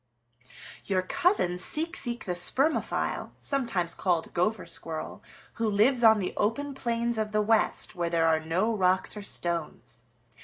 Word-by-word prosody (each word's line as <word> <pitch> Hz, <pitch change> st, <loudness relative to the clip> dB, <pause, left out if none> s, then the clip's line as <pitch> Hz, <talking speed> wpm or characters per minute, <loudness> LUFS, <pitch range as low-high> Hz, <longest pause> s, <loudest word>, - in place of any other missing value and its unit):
"Your 185 Hz, -2 st, 0 dB
cousin, 185 Hz, -, +1 dB
Seek 320 Hz, -, +1 dB
Seek 240 Hz, -2 st, -2 dB
the 185 Hz, -, -3 dB
Spermophile, 265 Hz, -, +1 dB
sometimes 230 Hz, -, -1 dB
called 175 Hz, -3 st, -1 dB
Gopher 185 Hz, +4 st, 0 dB
Squirrel, 160 Hz, -1 st, -4 dB, 0.3 s
who 230 Hz, -1 st, -1 dB
lives 235 Hz, +5 st, +2 dB
on 220 Hz, -1 st, +7 dB
the 190 Hz, -3 st, -3 dB
open 275 Hz, +7 st, -1 dB
plains 235 Hz, -3 st, -2 dB
of 215 Hz, -1 st, -3 dB
the 215 Hz, -, +2 dB
West 220 Hz, +1 st, +1 dB
where 170 Hz, -1 st, -2 dB
there 165 Hz, -1 st, +1 dB
are 160 Hz, -1 st, +3 dB
no 180 Hz, +8 st, -1 dB
rocks 185 Hz, 0 st, +2 dB
or 210 Hz, -, -6 dB
stones. 155 Hz, -, -3 dB
205 Hz, 150 wpm, -27 LUFS, 175-235 Hz, 0.3 s, on